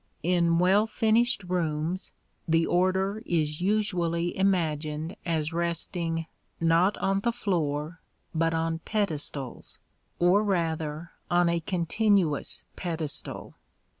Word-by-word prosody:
In 170 -1 +3
well 190 +5 +4
finished 225 +1 +2
rooms 175 0 -2 0.4
the 165 0 +3
order 190 +3 +1
is 155 -2 -1
usually 175 -4 0
imagined 160 -4 0
as 160 -1 -1
resting, 170 -1 -1 0.3
not 165 +4 +3
on 195 0 +1
the 235 +4 +1
floor, 170 -7 -2 0.3
but 165 0 +2
on 165 0 -1
pedestals, 155 - -3 0.4
or 180 +4 +4
rather 165 -4 -1 0.2
on 175 -1 +3
a 170 0 +1
continuous 180 -1 +1
pedestal. 160 -4 -4
170 Hz, 105 wpm, -27 LUFS, 160-190 Hz, 0.4 s, well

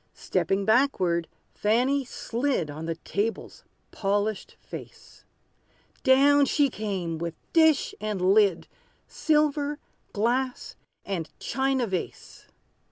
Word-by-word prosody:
Stepping 195 0 -1
backward, 190 -9 +2 0.3
Fanny 250 +6 +1
slid 240 - -2
On 155 +2 -7
the 165 - -2
table's 205 +6 -4 0.3
polished 205 +1 -2
face: - - -11 0.8
Down 280 +2 +5
she 280 -2 +2
came, 190 -7 -3
with 170 -1 -4 0.2
dish 320 -3 +4
and 210 -2 -2
lid, 200 -5 +3 0.4
Silver 295 -1 +1 0.3
glass 245 +4 -1 0.3
and 180 -5 -3
china 265 0 0
vase! 190 -5 -6
220 Hz, 100 wpm, -26 LUFS, 190-270 Hz, 0.8 s, Down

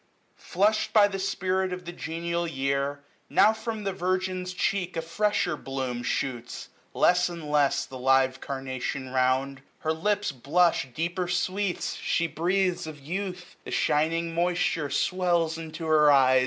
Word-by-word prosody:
Flushed 215 +4 +1
by 210 -3 +7
the 195 -1 -4
spirit 190 -1 -1
of 180 0 -6
the 175 - -5
genial 170 +1 -3
year, 140 -1 -1 0.3
960 - - -15
Now 210 +3 +6
from 220 -1 -5
the 195 -1 -1
virgin's 185 0 -1
cheek 180 -1 -1
a - - 0
fresher 180 0 0
bloom 130 -4 -4
Shoots, 120 0 -3 0.3
less 180 0 +4
and 170 -3 -7
less, 145 -2 +2
the 130 - -9
live 135 0 +3
carnation 130 -1 -4
round; 130 +1 +1 0.2
Her 160 0 0
lips 205 +4 0
blush 145 +4 +2
deeper 175 +6 -2
sweets; 185 +2 -1
she 165 - 0
breathes 180 +1 0
of 155 -2 -8
youth; 180 +4 -5
The - - -9
shining 165 +2 +1
moisture 170 -3 0
swells 170 +2 +1
into 160 0 -7
her 155 -2 +5
eyes. 130 -2 +5
170 Hz, 150 wpm, -27 LUFS, 140-185 Hz, 0.3 s, by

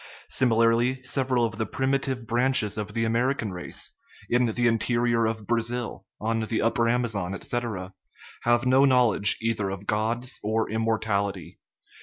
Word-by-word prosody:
Sim 130 -2 +2
ilarly, 115 +3 +2
several 130 -3 +1
of 110 -1 -5
the 110 - 0
primitive 130 -2 -1
branches 120 -2 +2
of 105 -1 -5
the 115 - +1
Ameri 120 +5 +1
can 105 -3 -3
race, 90 -1 -6 0.4
in 120 0 +3
the 120 +2 0
interior 115 0 +2
of 110 -1 -4
Brazil, 120 -2 -2
on 115 +1 -1
the 110 0 -1
upper 115 +1 +2
Amazon, 110 -6 -1
etc., 105 -6 -4 0.5
have 120 +1 +2
no 130 +2 +5
knowledge 125 -6 +4
either 110 -3 -1
of 95 +1 -6
gods 120 +5 -1
or 110 +1 -1
immortality. 110 -3 -1
115 Hz, 150 wpm, -26 LUFS, 110-120 Hz, 0.5 s, no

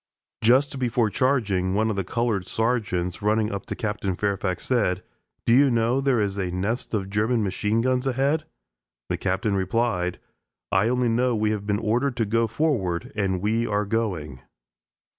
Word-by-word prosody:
Just 130 +4 +3
before 120 -3 +1
charging, 100 -9 +1
one 110 +2 +2
of - - -3
the 100 - -1
colored 105 -2 -1
sergeants, 105 -7 -1
running 105 +1 +1
up 100 0 -5
to - - -3
Captain 105 -3 -2
Fairfax, 100 -2 -1
said: 100 -8 +1 0.4
"Do 115 - +4
you 140 +3 +6
know 120 +2 +2
there 135 -3 +2
is 100 -1 -1
a 95 -2 -1
nest 100 +7 -2
of 95 -3 -2
German 110 +3 +1
machine 105 +3 0
guns 130 +2 +1
ahead?" 135 +4 +1 0.6
The - - 0
Captain 100 +2 0
replied: 95 -2 0 0.5
"I 100 +3 +3
only 125 -1 +1
know 120 +1 +2
we 105 0 +1
have 105 -1 -3
been 100 -1 +1
ordered 120 +5 0
to 115 - +1
go 115 +2 +1
forward, 110 - -1
and 95 -3 -1
we 115 +3 +1
are 105 0 0
going." 90 - -2
110 Hz, 170 wpm, -25 LUFS, 95-120 Hz, 0.6 s, you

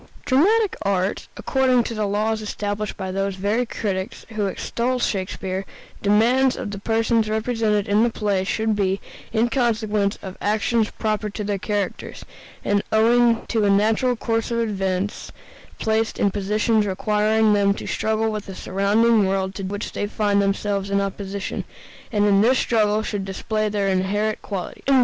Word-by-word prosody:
Dramatic 395 +11 +3
art, 195 0 -1
according 260 -2 +2
to 230 - -4
the 215 -2 -1
laws 215 +2 0
established 210 0 -3
by 190 0 -4
those 195 0 -1
very 210 +6 0
critics 195 -4 -4
who 215 -2 -1
extol 240 +6 -2
Shakespeare, 190 -3 -2 0.4
demands 240 +6 +3
that 210 - -5
the 200 - -6
persons 225 +1 +1
represented 220 -2 0
in 205 +2 +3
the 235 - +4
play 205 -4 0
should 220 +2 0
be, 195 -1 0 0.3
in 225 +1 +2
consequence 220 -5 0
of 190 -1 -8
actions 215 +1 +1
proper 215 -1 -2
to 210 +1 -5
their 200 -1 -2
characters, 205 -1 -3 0.4
and 205 0 +2
owing 230 +1 +4
to 225 -3 +1
a 205 - +3
natural 220 +5 +3
course 225 0 -1
of 235 - -1
events, 195 -3 -2 0.5
placed 220 0 0
in 200 - +2
positions 210 +2 +1
requiring 210 +2 +2
them 200 -1 +3
to - - -7
struggle 220 0 0
with 210 -1 -5
the 190 - -7
surrounding 205 +3 +2
world 190 0 -1
to 195 - -6
which 200 +2 -4
they 205 - -2
find 205 -1 +1
themselves 200 0 -1
in 200 0 +2
opposition, 195 0 -4 0.5
and 205 -1 +2
in 200 -1 +4
this 250 +4 +4
struggle 215 -2 +2
should 205 -2 -3
display 215 +3 -2
their 200 -1 0
inherent 200 +3 0
qualities. 195 -4 -5
210 Hz, 160 wpm, -22 LUFS, 200-225 Hz, 0.5 s, the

